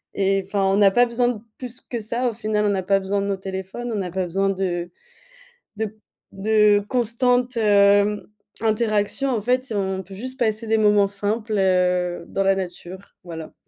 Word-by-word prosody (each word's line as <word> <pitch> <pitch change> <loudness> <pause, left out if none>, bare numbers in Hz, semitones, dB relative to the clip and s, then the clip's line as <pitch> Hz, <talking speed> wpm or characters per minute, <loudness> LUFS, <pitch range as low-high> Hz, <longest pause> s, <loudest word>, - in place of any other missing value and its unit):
et 195 0 +1
enfin 195 0 -1
on 195 0 +2
n'a 200 -1 +5
pas 245 +5 +4
besoin 240 +1 0
de 240 -3 -3 0.2
plus 250 -1 -8
que 240 - -6
ça 235 +4 -1
au - - -6
final. 215 -1 -1
On - - +2
n'a 195 -2 -1
pas 195 +1 +2
besoin 195 +1 -1
de 200 - -2
nos 200 -1 -1
téléphones, 190 +5 -6
on - - -2
n'a 180 -2 -4
pas 185 +1 -1
besoin 195 +3 0
de 180 -3 -2 0.9
de 215 -1 -3 0.4
de 210 +1 +3
constantes, 245 0 +1
hem, 205 -1 +3 0.3
interactions 220 +3 0
en 235 -4 0
fait, 250 +3 -1
on 190 -1 -2
peut 190 +1 -12
juste 255 +5 -6
passer 220 -1 0
des 225 0 +2
moments 210 -2 +4
simples, 210 +3 -3
heu, 180 -2 +1
dans 195 - -2
la 195 0 +3
nature 185 +1 -7
voilà. 165 -3 -9
205 Hz, 190 wpm, -22 LUFS, 190-225 Hz, 0.9 s, n'a